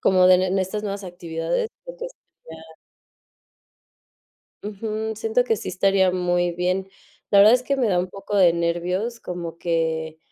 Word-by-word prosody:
como 185 Hz, -1 st, +4 dB
de 185 Hz, -, +8 dB
en 185 Hz, -, 0 dB
en 185 Hz, +1 st, 0 dB
estas 190 Hz, +3 st, -2 dB
nuevas 200 Hz, -1 st, -4 dB
actividades, 170 Hz, -, -3 dB, 0.2 s
porque -, -, -7 dB
estudiar 160 Hz, -, -15 dB, 2.0 s
Ujú, 215 Hz, +1 st, -4 dB
siento 225 Hz, +3 st, 0 dB
que 225 Hz, -3 st, +1 dB
sí -, -, -6 dB
estaría 190 Hz, 0 st, +2 dB
muy 175 Hz, -1 st, 0 dB
bien. 180 Hz, +2 st, -1 dB, 0.4 s
La 200 Hz, -, +5 dB
verdad 210 Hz, +4 st, +8 dB
es 250 Hz, -, +1 dB
que 275 Hz, +2 st, -1 dB
me 250 Hz, -4 st, +1 dB
da 180 Hz, -3 st, +2 dB
un 180 Hz, +1 st, -1 dB
poco 200 Hz, +2 st, -5 dB
de 180 Hz, -3 st, +6 dB
nervios, 180 Hz, +7 st, -2 dB
como 170 Hz, -2 st, -6 dB
que, 160 Hz, -1 st, -2 dB
185 Hz, 165 wpm, -23 LUFS, 175-215 Hz, 2.0 s, de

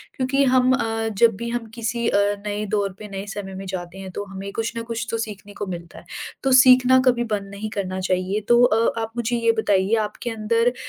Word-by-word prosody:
क्योंकि 270 Hz, +2 st, +1 dB
हम 255 Hz, 0 st, +4 dB
अ, 225 Hz, -3 st, -1 dB
जब 230 Hz, -1 st, +5 dB
भी 235 Hz, +3 st, -5 dB
हम 240 Hz, -1 st, -3 dB
किसी 230 Hz, 0 st, -2 dB
अ, -, -, +2 dB, 0.3 s
नए 210 Hz, 0 st, -2 dB
दौर 200 Hz, -2 st, 0 dB
पे 215 Hz, -, -8 dB
नए 195 Hz, -1 st, -6 dB
समय 195 Hz, -2 st, -6 dB
में 195 Hz, -, -7 dB
जाते 185 Hz, -1 st, -6 dB
हैं 190 Hz, -1 st, -8 dB
तो 205 Hz, -, -4 dB
हमें 195 Hz, 0 st, -7 dB
कुछ 225 Hz, +1 st, -2 dB
न 230 Hz, -, -3 dB
कुछ 230 Hz, 0 st, -4 dB
तो 230 Hz, -, 0 dB
सीखने 205 Hz, -2 st, -6 dB
को 205 Hz, -, -5 dB
मिलता 170 Hz, 0 st, -11 dB
है, -, -, -18 dB, 0.4 s
तो 270 Hz, -, +2 dB
सीखना 255 Hz, 0 st, +6 dB
कभी 240 Hz, -1 st, +3 dB
बंद 200 Hz, -1 st, -6 dB
नहीं 215 Hz, +2 st, -5 dB
करना 190 Hz, -3 st, -3 dB
चाहिए। 185 Hz, +2 st, -1 dB
तो 240 Hz, 0 st, +5 dB
अ, 230 Hz, -1 st, +2 dB
आप 225 Hz, 0 st, -4 dB
मुझे 235 Hz, +1 st, 0 dB
ये 230 Hz, 0 st, +3 dB
बताइए 200 Hz, 0 st, +2 dB
आपके 240 Hz, +4 st, -7 dB
अंदर 230 Hz, +2 st, +1 dB
220 Hz, 225 wpm, -22 LUFS, 195-235 Hz, 0.4 s, सीखना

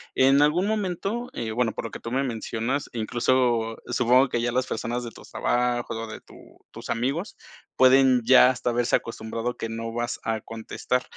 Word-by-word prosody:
En 135 Hz, +2 st, +5 dB
algún 160 Hz, +6 st, +3 dB
momento 215 Hz, +3 st, -2 dB
eh, 115 Hz, -2 st, -4 dB
bueno, 120 Hz, 0 st, 0 dB
por -, -, -5 dB
lo 115 Hz, -, -6 dB
que -, -, -7 dB
tú 115 Hz, -, -7 dB
me 135 Hz, +2 st, +1 dB
mencionas, 120 Hz, +2 st, -3 dB
incluso, 120 Hz, +2 st, +1 dB, 0.3 s
supongo 125 Hz, +2 st, +3 dB
que 120 Hz, -, -1 dB
ya 120 Hz, 0 st, -1 dB
las 130 Hz, 0 st, 0 dB
personas 120 Hz, +2 st, -3 dB
de 115 Hz, -, -6 dB
tus -, -, -15 dB
trabajo 120 Hz, -1 st, 0 dB
o 115 Hz, 0 st, -5 dB
de 110 Hz, -, -9 dB
tu -, -, -18 dB, 0.4 s
tus -, -, -10 dB
amigos, 135 Hz, -, -2 dB, 0.4 s
pueden 130 Hz, -1 st, +5 dB
ya 125 Hz, +1 st, +7 dB
hasta 125 Hz, -1 st, -1 dB
haberse 120 Hz, 0 st, +1 dB
acostumbrado 115 Hz, +1 st, -4 dB
que 115 Hz, -, -4 dB
no 115 Hz, 0 st, -5 dB
vas 120 Hz, 0 st, -3 dB
a 115 Hz, -1 st, -1 dB
contestar. 115 Hz, +2 st, -3 dB
120 Hz, 190 wpm, -25 LUFS, 115-130 Hz, 0.4 s, ya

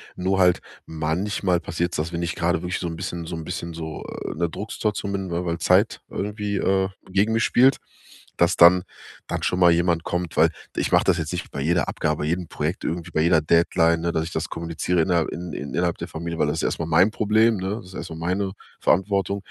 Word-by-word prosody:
Nur 95 Hz, +1 st, 0 dB
halt 90 Hz, -1 st, +4 dB, 0.2 s
manchmal 90 Hz, +4 st, -1 dB
passiert 85 Hz, +1 st, -2 dB
es, -, -, -2 dB
dass 80 Hz, +3 st, -3 dB
wenn 85 Hz, +1 st, -2 dB
ich 85 Hz, -, -2 dB
gerade 85 Hz, 0 st, 0 dB
wirklich 90 Hz, 0 st, -3 dB
so 85 Hz, -, -3 dB
'n 80 Hz, -, -4 dB
bisschen 85 Hz, +1 st, -5 dB
so 85 Hz, -, -5 dB
'n 80 Hz, -, -6 dB
bisschen 85 Hz, -1 st, -5 dB
so, 80 Hz, -1 st, -6 dB
äh, -, -, -6 dB
in -, -, -8 dB
'ner 85 Hz, 0 st, +1 dB
Drucksituation 105 Hz, +1 st, -3 dB
bin, 95 Hz, -2 st, -3 dB
weil 85 Hz, +1 st, -2 dB
weil 85 Hz, -1 st, -1 dB
Zeit -, -, +3 dB
irgendwie, 105 Hz, 0 st, -3 dB
äh, 95 Hz, 0 st, +2 dB, 0.2 s
gegen 100 Hz, +4 st, +2 dB
mich 115 Hz, +1 st, +2 dB
spielt, 130 Hz, +2 st, +4 dB, 0.6 s
dass 85 Hz, +1 st, +3 dB
dann 90 Hz, +1 st, +7 dB, 0.4 s
dann -, -, -3 dB
schon 90 Hz, -, 0 dB
mal 90 Hz, -1 st, +6 dB
jemand 85 Hz, -1 st, +2 dB
kommt, 90 Hz, -2 st, -3 dB
weil -, -, +5 dB, 0.2 s
ich -, -, -1 dB
mache -, -, +5 dB
das 90 Hz, -2 st, +3 dB
jetzt 80 Hz, -2 st, -3 dB
nicht 90 Hz, -, -4 dB
bei 70 Hz, -, -5 dB
jeder 85 Hz, +4 st, +1 dB
Abgabe, -, -, -1 dB
jedem 85 Hz, +1 st, -1 dB
Projekt, 80 Hz, +5 st, -3 dB
irgendwie 85 Hz, +1 st, -3 dB
bei 80 Hz, -, +1 dB
jeder 80 Hz, -1 st, +4 dB
Deadline, 85 Hz, +1 st, +3 dB
ne, 85 Hz, 0 st, 0 dB
dass 80 Hz, -1 st, 0 dB
ich 85 Hz, -, -7 dB
das 80 Hz, +1 st, -2 dB
kommuniziere 85 Hz, +1 st, -1 dB
innerhalb 85 Hz, -1 st, +1 dB
in 85 Hz, -1 st, -6 dB
in 70 Hz, -1 st, -6 dB
innerhalb 85 Hz, 0 st, 0 dB
der -, -, -5 dB
Familie, 85 Hz, +1 st, -5 dB
weil -, -, +2 dB
das 75 Hz, -, -1 dB
ist -, -, -2 dB
erstmal 80 Hz, -, -1 dB
mein 85 Hz, +5 st, +5 dB
Problem, 110 Hz, +1 st, +3 dB
ne? 95 Hz, +3 st, -2 dB
Das 95 Hz, -, -10 dB
ist 90 Hz, -, -13 dB
erstmal 80 Hz, -1 st, -6 dB
meine 95 Hz, +3 st, -1 dB, 0.3 s
Verantwortung. 100 Hz, +1 st, +1 dB
85 Hz, 230 wpm, -23 LUFS, 80-95 Hz, 0.6 s, dann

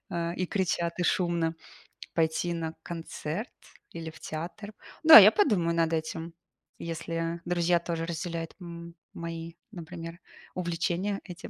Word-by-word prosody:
э, 170 Hz, 0 st, -2 dB
и 185 Hz, 0 st, -1 dB
кричат, 175 Hz, -3 st, -1 dB
и -, -, +1 dB
шумно,- 170 Hz, -2 st, +1 dB, 0.6 s
пойти 165 Hz, +1 st, +1 dB
на 165 Hz, -1 st, -3 dB
концерт 165 Hz, +4 st, -5 dB, 0.4 s
или 165 Hz, -1 st, -6 dB
в -, -, -15 dB
театр. 175 Hz, +7 st, -6 dB, 0.3 s
Да, 320 Hz, 0 st, +12 dB
я -, -, +11 dB
подумаю 190 Hz, -, +2 dB
над 165 Hz, -1 st, +2 dB
этим. 165 Hz, +1 st, -3 dB, 0.5 s
Если 165 Hz, 0 st, -3 dB
друзья 175 Hz, 0 st, +2 dB
тоже 165 Hz, -1 st, -3 dB
разделяют 165 Hz, 0 st, -4 dB
м 170 Hz, 0 st, -9 dB, 0.2 s
мои, 165 Hz, 0 st, -6 dB, 0.2 s
например, 170 Hz, -1 st, -8 dB, 0.3 s
увлечения 180 Hz, +3 st, -1 dB
этим. 180 Hz, -3 st, -9 dB
170 Hz, 130 wpm, -29 LUFS, 165-175 Hz, 0.6 s, Да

